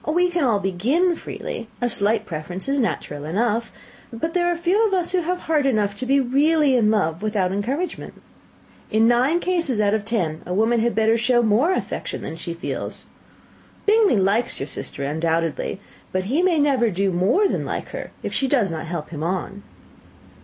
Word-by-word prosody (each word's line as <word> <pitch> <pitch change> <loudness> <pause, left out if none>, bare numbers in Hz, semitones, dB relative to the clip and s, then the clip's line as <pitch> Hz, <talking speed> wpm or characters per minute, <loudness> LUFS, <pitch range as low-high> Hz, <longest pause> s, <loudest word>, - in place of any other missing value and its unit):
We 350 +3 +2
can 345 -3 0
all 230 -6 +2
begin 245 - +1
freely 230 -6 -6
a 245 - +1
slight 215 -1 +1
preference 175 - -6
is 275 +1 +1
natural 145 - -2
enough; 225 +8 -1 0.4
but 285 +8 -3
there 350 -1 +2
are 350 - +1
very 340 - -11
few 405 +6 +3
of 390 - 0
us 355 -2 -1
who 365 -1 +1
have 360 +2 -2
heart 300 -3 +1
enough 210 -5 +1
to 255 - -4
be 275 +1 +4
really 280 +2 +3
in 225 -4 +3
love 170 -6 0
without 205 -4 0
encouragement. 260 - -3 0.7
In 220 +1 +3
nine 255 +8 +3
cases 335 -10 0
out 205 -1 +3
of 220 -2 0
ten, 185 -8 -2
a 180 - -4
woman 225 +3 +3
had 235 +1 0
better 225 +1 +3
show 240 +1 +3
more 230 - +3
affection - - -4
than 160 - -5
she 170 +1 -6
feels. 170 - -4 0.8
Bingley 420 - +4
likes 200 +5 +1
your 135 - -2
sister 140 - -6
undoubtedly; 160 +4 -1 0.3
but 185 0 -1
he 265 - +1
may 360 -3 +3
never 275 -5 +3
do 195 0 0
more 190 - +3
than - - -2
like - - -4
her, - - -6
if - - -4
she 270 - +1
does 245 -9 +2
not 160 0 -5
help 165 -2 -5
him 150 -3 -6
on." 185 +4 -3
230 Hz, 195 wpm, -22 LUFS, 190-300 Hz, 0.8 s, be